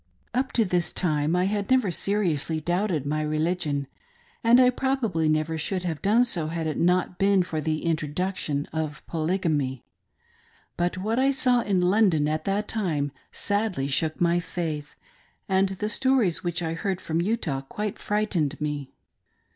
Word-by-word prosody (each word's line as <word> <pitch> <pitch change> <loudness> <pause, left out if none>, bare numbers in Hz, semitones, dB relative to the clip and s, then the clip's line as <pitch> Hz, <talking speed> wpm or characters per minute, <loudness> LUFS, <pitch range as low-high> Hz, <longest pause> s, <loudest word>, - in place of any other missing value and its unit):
Up 255 +2 0
to 230 - +3
this 180 -2 0
time 155 -2 0
I 180 - +2
had 200 +1 -1
never 255 -7 +3
seriously 170 -5 0
doubted 175 -2 0
my 155 +2 -1
religion, 155 -1 -1 0.6
and 235 +2 +6
I 250 -1 +6
probably 235 - 0
never 155 +1 0
should 185 +3 -1
have 165 -4 -3
done 225 +5 +4
so 170 -10 -1
had 165 0 -3
it 155 - -2
not 180 +1 +1
been 195 -1 +4
for 160 -3 -3
the 155 +2 -2
introduction 155 -1 -1
of 155 -1 -4
Polygamy. 155 -6 -1 0.9
But 175 +1 -1
what 220 +6 -1
I 270 +1 +4
saw 255 -3 +3
in 195 -5 +1
London 180 -5 +3
at 155 +1 -2
that 205 +2 0
time 155 -10 -1 0.2
sadly 205 -9 -1
shook 155 +3 0
my 175 0 +3
faith, 160 -4 -4 0.5
and 190 0 +2
the 195 +2 -3
stories 250 -6 +2
which 175 -1 -1
I 160 0 -1
heard 185 +3 -2
from 165 -1 -1
Utah 175 - -1
quite 205 +9 -5
frightened 200 -9 -1
me. 145 -3 -4
175 Hz, 160 wpm, -26 LUFS, 155-205 Hz, 0.9 s, and